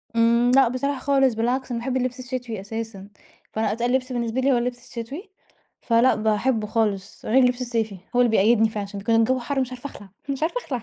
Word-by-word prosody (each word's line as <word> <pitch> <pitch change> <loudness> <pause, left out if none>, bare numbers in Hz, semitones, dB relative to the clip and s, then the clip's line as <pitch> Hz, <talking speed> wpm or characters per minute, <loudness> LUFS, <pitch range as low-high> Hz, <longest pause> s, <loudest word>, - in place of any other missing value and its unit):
امم، 235 +1 +4
لأ 270 -3 +6
بصراحة 260 +2 -2
خالص 270 -2 +3
بالعكس، 245 +3 -1
أنا 235 - -1
باحب 260 +2 -2
اللبس 255 0 -2
الشتوي 250 -5 -5
أساسًا. 220 -1 -6 0.5
فأنا 220 -1 0
أتقل 240 +3 -1
لبس 260 0 0
بالنسبة 240 +1 -1
لي 275 +1 +3
هو 250 - +3
اللبس 245 +1 -4
الشتوي، 285 - -6 0.5
فلأ 235 +2 +3
باحبه 215 +1 0
خالص. 205 -3 -2
غير 255 +4 +4
اللبس 250 0 +1
الصيفي 225 -5 -2 0.2
هو 245 - +4
اللي 240 -2 +3
بيقيدني 220 +1 +4
فعشان 200 -2 -5
كان 225 +3 +1
الجو 255 +3 +2
حر 270 +3 -2
مش 255 0 -3
عارفة 255 +3 -7
أخلع، 205 -6 -13 0.2
مش 275 +2 -2
عارفة 345 +10 0
أخلع. 250 -5 -3
240 Hz, 205 wpm, -23 LUFS, 225-255 Hz, 0.5 s, لأ